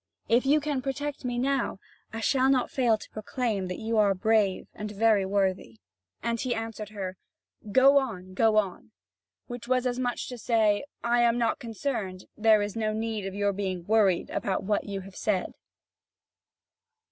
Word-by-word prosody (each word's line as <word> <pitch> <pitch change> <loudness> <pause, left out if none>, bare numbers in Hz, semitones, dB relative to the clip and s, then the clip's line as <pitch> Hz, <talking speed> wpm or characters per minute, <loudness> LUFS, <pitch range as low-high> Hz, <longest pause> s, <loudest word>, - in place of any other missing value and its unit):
If 245 +3 +3
you 295 +2 +5
can 290 -3 -2
protect 285 +2 -4
me 245 -1 -2
now, 270 -2 0 0.3
I 225 +1 -5
shall 260 +3 +3
not 260 -2 +2
fail 240 -4 +2
to - - -12
proclaim 215 -2 -2
that 180 - -4
you 225 0 0
are 200 -2 +4
brave 210 -1 +1
and 210 0 -6
very 210 -1 +2
worthy." 190 - -1 0.5
And 235 0 -1
he 255 -2 -1
answered 225 -2 -5
her: 190 -3 -5 0.5
"Go 270 +5 +6
on, 185 -8 -6
go 220 +2 +3
on!" 200 -1 -1 0.6
which 245 -1 -8
was 255 0 +1
as 250 0 -1
much 245 -1 -1
as - - -7
to 250 - -6
say: 220 0 +2 0.2
"I 240 +1 +3
am 235 0 +3
not 235 -1 +1
concerned; 220 -6 -4
there 215 -1 +4
is 205 +1 -4
no 215 -1 -1
need 220 -2 -3
of 195 - -6
your 205 0 +1
being 185 -3 -3
worried 205 -4 +2
about 190 -2 -1
what 205 +1 0
you 200 -1 -4
have 190 0 -12
said." 200 -4 -1
220 Hz, 180 wpm, -27 LUFS, 200-245 Hz, 0.6 s, Go